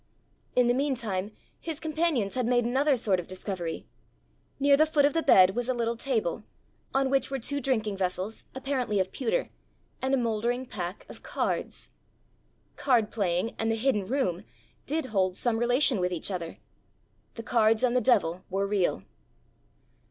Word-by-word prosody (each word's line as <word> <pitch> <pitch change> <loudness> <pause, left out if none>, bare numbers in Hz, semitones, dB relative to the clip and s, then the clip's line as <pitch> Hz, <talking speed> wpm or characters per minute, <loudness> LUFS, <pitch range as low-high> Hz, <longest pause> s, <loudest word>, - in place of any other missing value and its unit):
In 250 -1 +4
the 240 - +4
meantime 235 -8 -1 0.3
his 320 -3 -5
companions 310 -10 0
had 250 -2 -1
made 245 -1 +2
another 270 +3 +2
sort 200 -5 +1
of 175 - -7
discovery: 185 -3 -5 0.7
near 280 0 +5
the 310 +2 +4
foot 295 -2 +3
of 285 - +2
the 330 - +1
bed 190 -8 +6
was 245 +1 -2
a 255 - +1
little 235 0 -1
table, 230 -6 -1 0.5
on 270 0 +1
which 270 -2 +2
were 270 - -2
two 285 +3 -3
drinking 220 -6 0
vessels, 185 +3 -2
apparently 260 -6 -1
of 190 0 0
pewter, - - -1 0.5
and 265 +1 +2
a - - 0
mouldering 240 +2 -1
pack 180 -5 -6
of - - -11
cards! - - -3 0.9
Card 240 -6 +2
playing 195 0 0
and 225 - 0
the 225 - +1
hidden 220 -4 0
room 205 -8 -1 0.4
did 310 +1 -1
hold 185 -2 +1
some 235 -2 0
relation 245 0 +3
with 180 0 0
each 175 +3 -3
other! 170 -3 -5 0.8
The 230 - -6
cards 225 -1 +3
and 250 -1 +2
the 250 - +3
devil 195 -7 +2
were 195 +1 0
real! 195 - 0
235 Hz, 165 wpm, -28 LUFS, 195-265 Hz, 0.9 s, bed